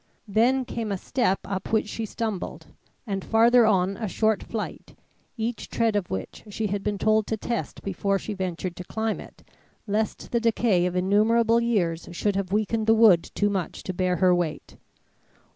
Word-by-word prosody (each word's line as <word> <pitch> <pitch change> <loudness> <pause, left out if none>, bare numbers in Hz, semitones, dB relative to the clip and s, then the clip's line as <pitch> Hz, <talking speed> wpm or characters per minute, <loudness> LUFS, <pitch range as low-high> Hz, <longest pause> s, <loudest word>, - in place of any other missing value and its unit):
Then 245 +6 +2
came 225 -3 -4
a 195 - -1
step 195 -1 0
up 195 -1 -4
which 220 -1 +2
she 220 +1 -4
stumbled, 215 -4 -4 0.4
and 195 -4 -3
farther 230 +1 +5
on 195 -2 +2
a 220 - -3
short 215 +1 +1
flight, 220 -2 -6 0.4
each 225 +1 -3
tread 230 -2 +1
of 200 -4 -1
which 95 0 -5
she 215 +2 -3
had 200 -1 -1
been 205 0 -2
told 215 +1 +2
to 220 - -1
test 235 +2 -4
before 195 +1 0
she 210 - -5
ventured 185 -2 -4
to 180 - -6
climb 220 +4 -2
it, - - -13 0.4
lest 215 0 -2
the 235 - +2
decay 225 -5 +2
of 180 - -4
innumerable 220 +5 +3
years 180 -8 0
should 200 +3 0
have 195 -2 -2
weakened 215 +1 0
the 225 - +6
wood 215 -7 +5
too 205 0 +1
much 190 -5 -3
to 185 - -4
bear 185 0 0
her 180 +1 +4
weight. 175 -3 -2
210 Hz, 180 wpm, -25 LUFS, 185-225 Hz, 0.4 s, the